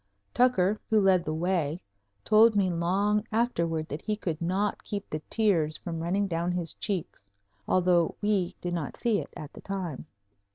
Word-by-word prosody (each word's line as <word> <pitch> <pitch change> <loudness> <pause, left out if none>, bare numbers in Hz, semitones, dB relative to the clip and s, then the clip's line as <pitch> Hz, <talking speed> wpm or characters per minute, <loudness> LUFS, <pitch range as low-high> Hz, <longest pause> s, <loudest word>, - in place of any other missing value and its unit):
Tucker, 215 -5 +3
who 220 -1 +4
led 190 -3 +4
the 155 - -2
way, 170 -2 0 0.5
told 220 +1 +6
me 190 -3 +2
long 195 +5 +1
afterward 170 -9 0
that 150 - -5
he 215 - -1
could 170 -6 -4
not 190 +4 -1
keep 200 -1 -5
the 155 - -4
tears 175 -9 +2
from 165 -2 -5
running 185 +5 0
down 170 -1 -1
his 175 -2 -2
cheeks, 170 - -4 0.4
although 180 -2 +3
we 205 -4 0
did 175 -1 -3
not 165 -5 -4
see 230 -4 +1
it - - -7
at 150 - -9
the - - -11
time. 180 -8 -5
180 Hz, 170 wpm, -28 LUFS, 165-205 Hz, 0.5 s, told